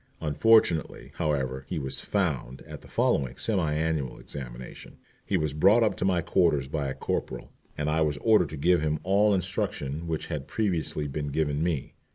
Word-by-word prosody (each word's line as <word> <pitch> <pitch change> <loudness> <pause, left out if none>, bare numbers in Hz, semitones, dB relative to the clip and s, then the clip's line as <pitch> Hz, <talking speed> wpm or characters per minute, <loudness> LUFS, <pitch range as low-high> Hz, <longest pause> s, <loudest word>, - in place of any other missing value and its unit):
Unfortunately, 85 +1 +2
however, 65 -3 -1
he - - -2
was 65 -3 -3
"found" 65 +2 -2
at - - -10
the - - -15
following 65 -2 0
semi 95 -9 0
annual 80 -4 -1
examination. 65 -3 -9 0.3
He 95 - 0
was 75 -4 -1
brought 100 +10 +5
up 105 -3 +1
to - - -1
my 90 -2 +2
quarters 80 -7 +2
by 70 0 -2
a 65 - -4
corporal, - - -4 0.3
and 75 - -1
I 80 +1 +1
was 75 -2 +1
ordered 110 +8 +3
to 80 - -7
give 85 +4 +3
him 75 0 0
all 100 +4 +3
instruction 80 -3 -2
which 80 -2 -2
had 70 -2 -5
previously 90 -8 -1
been 75 +1 -4
given 75 0 -1
me. 80 -5 -1
75 Hz, 180 wpm, -27 LUFS, 70-90 Hz, 0.3 s, brought